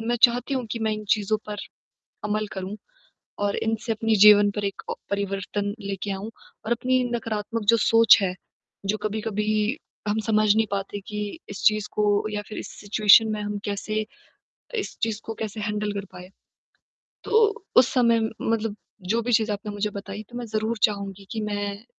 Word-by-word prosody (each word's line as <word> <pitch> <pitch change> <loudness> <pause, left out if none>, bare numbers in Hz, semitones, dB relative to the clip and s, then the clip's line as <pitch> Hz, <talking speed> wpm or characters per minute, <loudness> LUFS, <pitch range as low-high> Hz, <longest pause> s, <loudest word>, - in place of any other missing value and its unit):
मैं 235 +2 0
चाहती 245 +3 +4
हूँ 255 -2 -1
कि 230 - -2
मैं 220 -1 0
इन 215 0 -5
चीज़ों 210 +1 +2
पर 210 0 -5 0.7
अमल 210 0 -1
करूँ 190 +1 -5 0.6
और 205 0 0
इनसे 225 +1 -1
अपने 225 0 +1
जीवन 205 -1 +8
पर 205 0 -4
एक 195 - -4
अ, - - 0 0.2
परिवर्तन 200 0 -2
लेके 200 0 -4
आऊँ 195 +3 -4 0.4
और 220 - -3
अपनी 255 +2 +2
नकारात्मक 225 -1 -3
जो 230 - +4
सोच 225 0 +6
है 185 -2 0 0.5
जो 210 +2 0
कभी-कभी 215 +3 0 0.3
हम 210 +1 +1
समझ 215 -1 +4
नहीं 220 0 +3
पाते 200 0 -3
कि 210 -2 -4 0.3
इस 200 - -7
चीज़ 215 -1 +4
को 210 - +1 0.2
या 210 -1 -3
फिर 215 - -8
इस - - -6
सिचुएशन 210 +2 +6
में 215 -1 -2
हम 205 0 -3
कैसे 215 +1 -2 0.7
इस 410 - -4
चीज़ 220 -2 0
को 225 - -5
कैसे 215 -1 -5
हैंडल 210 0 -2
कर 200 -1 -4
पाए? 180 0 -10 1.0
तो 435 -2 +2
उस 250 - +7
समय 235 -3 +4 0.2
मतलब 225 -2 -1 0.3
जो 230 +2 +3
भी 245 - -1
चीज़ 220 -1 +3
आपने 205 +1 -5
मुझे 205 +1 -2
बताई 200 +1 -7
तो 240 - -10
मैं 240 - -5
ज़रूर 220 +1 -2
चाहूँगी 200 -2 0
कि 220 - -3
मैं 205 0 -3
215 Hz, 180 wpm, -25 LUFS, 205-225 Hz, 1.0 s, जीवन